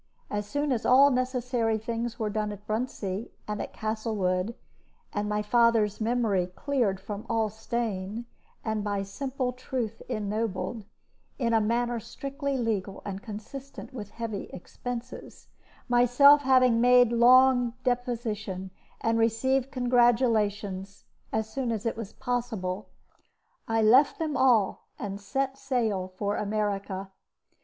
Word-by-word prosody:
As 205 Hz, 0 st, -2 dB
soon 290 Hz, +4 st, -1 dB
as 235 Hz, -3 st, 0 dB
all 275 Hz, +3 st, +6 dB
necessary 250 Hz, -3 st, 0 dB
things 230 Hz, +1 st, -3 dB
were 215 Hz, -2 st, -2 dB
done 210 Hz, 0 st, -1 dB
at 205 Hz, 0 st, -10 dB
Bruntsea 215 Hz, -2 st, -3 dB, 0.2 s
and 210 Hz, 0 st, -3 dB
at -, -, -5 dB
Castlewood, 215 Hz, -2 st, -1 dB, 0.6 s
and 205 Hz, 0 st, -1 dB
my 210 Hz, 0 st, 0 dB
father's 225 Hz, -2 st, +3 dB
memory 220 Hz, -6 st, +1 dB
cleared 210 Hz, 0 st, -1 dB
from 205 Hz, +1 st, -6 dB
all 225 Hz, -1 st, +1 dB
stain, 220 Hz, -1 st, -3 dB, 0.4 s
and 220 Hz, -2 st, -1 dB
by 205 Hz, -1 st, -1 dB
simple 255 Hz, +5 st, -3 dB
truth 245 Hz, -3 st, -4 dB
ennobled, 215 Hz, 0 st, -2 dB, 0.5 s
in 235 Hz, -4 st, 0 dB
a 225 Hz, -, +4 dB
manner 235 Hz, +2 st, 0 dB
strictly 275 Hz, +4 st, -4 dB
legal 210 Hz, -5 st, -2 dB
and 195 Hz, -1 st, -5 dB
consistent 265 Hz, +7 st, -8 dB
with 210 Hz, -5 st, -7 dB
heavy 220 Hz, -2 st, -5 dB
expenses, 245 Hz, +6 st, -8 dB, 0.4 s
myself 250 Hz, +4 st, +6 dB
having 255 Hz, -4 st, +4 dB
made 245 Hz, -1 st, +6 dB
a -, -, 0 dB
long 245 Hz, 0 st, +6 dB
deposition 225 Hz, -6 st, -2 dB, 0.3 s
and 225 Hz, 0 st, +1 dB
received 260 Hz, +4 st, +2 dB
congratulations 225 Hz, -6 st, +1 dB, 0.3 s
as 220 Hz, 0 st, -1 dB
soon 245 Hz, +2 st, -2 dB
as 220 Hz, -1 st, -3 dB
it 230 Hz, -, 0 dB
was 225 Hz, -2 st, -6 dB
possible, 230 Hz, -7 st, -3 dB, 0.8 s
I 225 Hz, -1 st, +2 dB
left 255 Hz, +7 st, +5 dB
them 310 Hz, -3 st, -2 dB
all, 245 Hz, -7 st, +3 dB
and 200 Hz, 0 st, -5 dB
set 270 Hz, +4 st, -2 dB
sail 220 Hz, -8 st, 0 dB
for 200 Hz, +2 st, -3 dB
America. 200 Hz, -2 st, -2 dB
225 Hz, 130 wpm, -28 LUFS, 205-250 Hz, 0.8 s, all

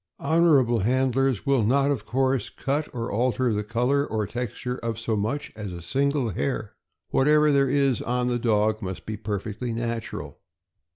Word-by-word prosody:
Honorable 140 Hz, -6 st, +3 dB
handlers 130 Hz, +2 st, +1 dB
will 135 Hz, -4 st, +3 dB
not, 135 Hz, +6 st, +3 dB
of 140 Hz, -, -3 dB
course, 130 Hz, -2 st, +1 dB
cut 145 Hz, +3 st, -2 dB
or 115 Hz, -1 st, -4 dB
alter 120 Hz, +1 st, +1 dB
the 105 Hz, 0 st, -1 dB
color 125 Hz, +6 st, +1 dB
or 110 Hz, -6 st, -2 dB
texture 125 Hz, +3 st, -4 dB
of 115 Hz, -2 st, -3 dB
so 115 Hz, -1 st, -1 dB
much 110 Hz, +8 st, -2 dB
as 105 Hz, -3 st, -6 dB
a 85 Hz, -, -7 dB
single 140 Hz, -, 0 dB
hair. 70 Hz, -5 st, -2 dB, 0.4 s
Whatever 150 Hz, +2 st, +4 dB
there 140 Hz, -1 st, +3 dB
is 140 Hz, -2 st, +2 dB
on 125 Hz, 0 st, -1 dB
the 120 Hz, -1 st, 0 dB
dog 110 Hz, -1 st, +1 dB
must 95 Hz, -2 st, -6 dB
be 110 Hz, -, -4 dB
perfectly 105 Hz, +3 st, -4 dB
natural. 115 Hz, 0 st, -4 dB
120 Hz, 165 wpm, -25 LUFS, 110-135 Hz, 0.4 s, Whatever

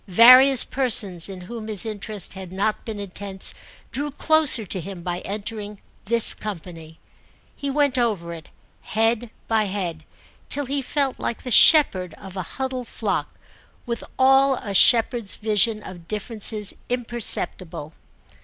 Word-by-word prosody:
Various 255 Hz, +7 st, +7 dB
persons 210 Hz, -9 st, +1 dB
in 190 Hz, -2 st, -9 dB
whom 220 Hz, +3 st, -9 dB
his 215 Hz, -1 st, +1 dB
interest 215 Hz, -1 st, -4 dB
had 190 Hz, -2 st, -10 dB
not 200 Hz, +3 st, -3 dB
been 220 Hz, -2 st, -6 dB
intense 195 Hz, 0 st, -6 dB, 0.4 s
drew 290 Hz, +2 st, -2 dB
closer 295 Hz, -5 st, +2 dB
to 185 Hz, 0 st, -2 dB
him 180 Hz, 0 st, -9 dB
by 175 Hz, 0 st, -4 dB
entering 210 Hz, +1 st, -6 dB, 0.3 s
this 230 Hz, +2 st, +2 dB
company. 165 Hz, -5 st, -9 dB, 0.6 s
He 280 Hz, -, -5 dB
went 280 Hz, -2 st, +1 dB
over 200 Hz, -8 st, -2 dB
it, 160 Hz, -1 st, -12 dB, 0.3 s
head 225 Hz, +2 st, -1 dB, 0.2 s
by 220 Hz, -2 st, +1 dB
head, 180 Hz, -5 st, -5 dB, 0.5 s
till 285 Hz, 0 st, 0 dB
he 275 Hz, +2 st, -3 dB
felt 275 Hz, 0 st, -3 dB
like 235 Hz, -, -5 dB
the 250 Hz, -, -6 dB
shepherd 190 Hz, -, +7 dB
of 190 Hz, -1 st, -13 dB
a 185 Hz, -, -4 dB, 0.2 s
huddled 260 Hz, -2 st, -4 dB
flock, -, -, -4 dB, 0.5 s
with 235 Hz, -1 st, -5 dB
all 270 Hz, +1 st, +4 dB
a 205 Hz, -5 st, -7 dB
shepherd's 230 Hz, 0 st, +4 dB
vision 215 Hz, 0 st, 0 dB
of 175 Hz, -3 st, -12 dB
differences 210 Hz, 0 st, -3 dB, 0.2 s
imperceptible. 200 Hz, -9 st, -1 dB
215 Hz, 140 wpm, -22 LUFS, 190-245 Hz, 0.6 s, Various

